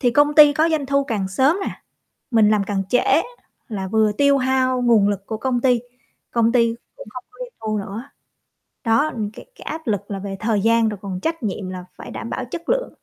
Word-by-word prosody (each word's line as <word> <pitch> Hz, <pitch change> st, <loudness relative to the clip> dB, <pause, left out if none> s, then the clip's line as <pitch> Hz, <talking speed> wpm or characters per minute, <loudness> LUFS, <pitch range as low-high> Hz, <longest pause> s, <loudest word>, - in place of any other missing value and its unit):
thì 245 Hz, -3 st, +3 dB
công 290 Hz, +3 st, +3 dB
ty 295 Hz, -1 st, +8 dB
có 315 Hz, +3 st, +2 dB
doanh 305 Hz, -4 st, 0 dB
thu 280 Hz, +1 st, +1 dB
càng 210 Hz, -7 st, -2 dB
sớm 265 Hz, -, +2 dB
nè. -, -, -7 dB, 0.5 s
Mình 220 Hz, -3 st, +5 dB
làm 210 Hz, -2 st, +2 dB
càng 195 Hz, -1 st, -2 dB
trễ, 250 Hz, -, +4 dB, 0.7 s
là 195 Hz, -6 st, -4 dB
vừa 215 Hz, +1 st, +2 dB
tiêu 280 Hz, +6 st, +3 dB
hao 255 Hz, -1 st, +1 dB
nguồn 230 Hz, -4 st, +4 dB
lực 200 Hz, -1 st, -3 dB
của 220 Hz, 0 st, -4 dB
công 250 Hz, 0 st, -1 dB
ty, 250 Hz, -2 st, +3 dB, 0.5 s
công 230 Hz, -1 st, +2 dB
ty 230 Hz, -2 st, +2 dB, 0.2 s
cũng -, -, -11 dB
hông 255 Hz, -, -7 dB
có 420 Hz, -, -21 dB
doanh -, -, -8 dB
thu 215 Hz, -1 st, -2 dB
nữa. 205 Hz, +4 st, -5 dB, 0.8 s
Đó, 230 Hz, +7 st, +2 dB
n 210 Hz, -2 st, -2 dB
cái -, -, -12 dB
cái -, -, -16 dB
áp 320 Hz, 0 st, -6 dB
lực 205 Hz, -2 st, -2 dB
là 195 Hz, -, -3 dB
về 195 Hz, 0 st, -5 dB
thời 215 Hz, -2 st, +1 dB
gian, 230 Hz, +1 st, +3 dB
rồi 210 Hz, -2 st, -5 dB
còn 185 Hz, -2 st, -5 dB
trách 325 Hz, 0 st, -2 dB
nhiệm 200 Hz, -2 st, -3 dB
là 185 Hz, -1 st, -7 dB
phải -, -, -9 dB
đảm 230 Hz, -, -6 dB
bảo 260 Hz, -, -3 dB
chất 335 Hz, +3 st, -7 dB
lượng. -, -, 0 dB
230 Hz, 230 wpm, -21 LUFS, 205-275 Hz, 0.8 s, ty